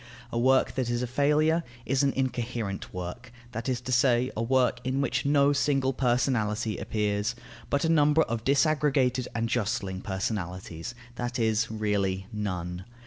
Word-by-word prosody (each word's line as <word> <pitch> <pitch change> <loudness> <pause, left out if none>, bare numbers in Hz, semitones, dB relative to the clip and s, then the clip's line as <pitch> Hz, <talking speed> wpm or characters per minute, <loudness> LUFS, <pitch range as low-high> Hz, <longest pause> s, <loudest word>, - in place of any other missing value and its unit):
A 115 - -1
work 130 +2 +3
that 130 -3 -1
is 120 +1 0
a - - +1
failure 150 +6 +2 0.2
is 135 +1 +1
an 140 -1 +3
incoherent 120 -6 -3
work; 90 +7 -6 0.2
that 115 +3 -4
is 125 -2 0
to 125 - -5
say, 125 0 +3
a 110 - -1
work 125 +1 +2
in 130 +2 -1
which 140 0 0
no 140 0 +4
single 135 -2 +1
personality 120 -4 0
appears, 105 +2 -1 0.3
but 140 +2 +1
a - - +3
number 150 0 +4
of 115 -1 -3
disaggregated 140 -3 +2
and 115 0 0
jostling 105 -5 -1
personalities, 95 0 -4 0.2
that 120 0 -3
is, 110 -1 +1
really, 100 -3 -1
none. 90 -3 -4
120 Hz, 155 wpm, -28 LUFS, 105-135 Hz, 0.3 s, no